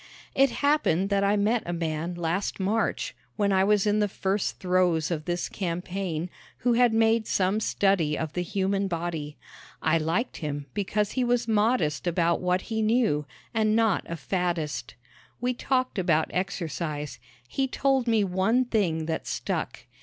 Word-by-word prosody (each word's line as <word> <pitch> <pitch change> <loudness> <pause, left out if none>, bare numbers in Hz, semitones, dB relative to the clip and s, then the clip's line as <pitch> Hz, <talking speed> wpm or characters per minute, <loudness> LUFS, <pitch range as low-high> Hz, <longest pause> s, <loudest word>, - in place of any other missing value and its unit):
It 275 0 +4 0.2
happened 200 - +2
that 200 0 +2
I 200 +1 +3
met 215 +3 +2
a 175 - -2
man 165 +1 -2
last 175 +5 -2
March, 210 +4 0 0.2
when 200 -2 +1
I 190 0 +4
was 205 0 +3
in 210 0 +2
the 210 - +3
first 195 0 -1
throes 180 -3 +2
of 155 -2 -2
this 175 0 -1
campaign, 180 -2 -3 0.4
who 245 - +4
had 240 0 +4
made 225 0 +3
some 190 +2 +1
study 195 -8 +1
of 160 -2 -3
the 180 - -1
human 195 +2 0
body. 165 -4 -4 0.4
I 165 +1 +2
liked 165 +10 -1
him 145 -3 -4
because 205 +1 0
he 255 - 0
was 240 -1 +1
modest 210 - +1
about 170 0 +1
what 180 0 +1
he 220 +2 -3
knew, 215 - +2 0.3
and 215 -1 +2
not 225 -4 +2
a 170 - -2
faddist. 165 -5 -2 0.4
We 250 +1 0
talked 255 -3 0
about 165 -4 +2
exercise. 160 -7 -3 0.3
He 270 - -1
told 265 -1 +1
me 225 -2 +3
one 195 +7 +2
thing 175 -9 0
that 160 0 -3
stuck. - - -3
190 Hz, 160 wpm, -27 LUFS, 165-220 Hz, 0.4 s, It